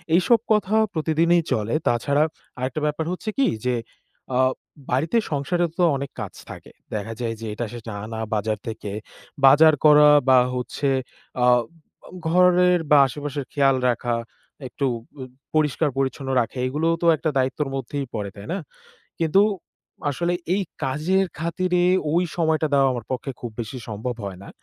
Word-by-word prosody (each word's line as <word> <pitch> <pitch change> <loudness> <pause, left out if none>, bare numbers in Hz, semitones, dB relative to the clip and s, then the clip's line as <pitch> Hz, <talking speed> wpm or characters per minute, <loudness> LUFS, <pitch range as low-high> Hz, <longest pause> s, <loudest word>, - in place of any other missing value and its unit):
এইসব 225 +6 +4
কথা 210 -1 +2 0.2
প্রতিদিনই 165 +2 +2
চলে।" 110 +1 0
তাছাড়া 140 +5 +2 0.4
আরেকটা 130 +4 -3
ব্যাপার 150 +2 -1
হচ্ছে 185 +4 -4
কি? 275 - +4 0.2
যে, 125 - +2 0.6
আ - - +2 0.5
বাড়িতে 155 - +1
সংসারেও 170 +4 0
তো - - +4
অনেক 140 0 -5
কাজ - - -6 0.2
থাকে। - - -10 0.2
দেখা 105 +2 -4
যায় 115 -2 -2
যে, - - -5
এটা 120 +3 -3
সেটা 115 -1 -7
আনা 110 +1 -6 0.2
বাজার 110 +1 -1
থেকে, 110 -2 -5 0.5
বাজার 150 +4 +7
করা 150 0 +8 0.2
বা 130 - +7 0.2
হচ্ছে 125 +3 -2 0.5
আ - - +5 0.8
ঘরের 180 +1 +4
বা 150 - +8
আশেপাশের 145 0 -5
খেয়াল 135 -2 +3
রাখা, 120 0 -1 0.5
একটু 140 +2 -3 0.4
উ - - -4 0.3
পরিষ্কার-পরিচ্ছন্ন 140 -3 0
রাখা 115 +3 -5
এগুলোও 160 +5 0
তো - - -1
একটা 160 - -1
দায়িত্বের 135 +2 0
মধ্যেই 135 +2 -4
পড়ে, 105 -2 -3
তাই 100 - -10
না? - - -1 0.6
কিন্তু, 165 +4 +4 0.7
আসলে 170 +5 -1 0.2
এই 200 - +1 0.2
কাজের 170 +8 +1
খাতিরে 175 +2 0 0.3
ওই 175 +2 +3
সময়টা 160 -1 +1
দেওয়া 135 -1 +4
আমার 120 -3 -5
পক্ষে 130 +2 -3
খুব 120 - -6
বেশি 115 +3 -5
সম্ভব 110 +3 -4
হয় 95 -2 -7
না। - - -11
145 Hz, 150 wpm, -23 LUFS, 125-165 Hz, 0.8 s, করা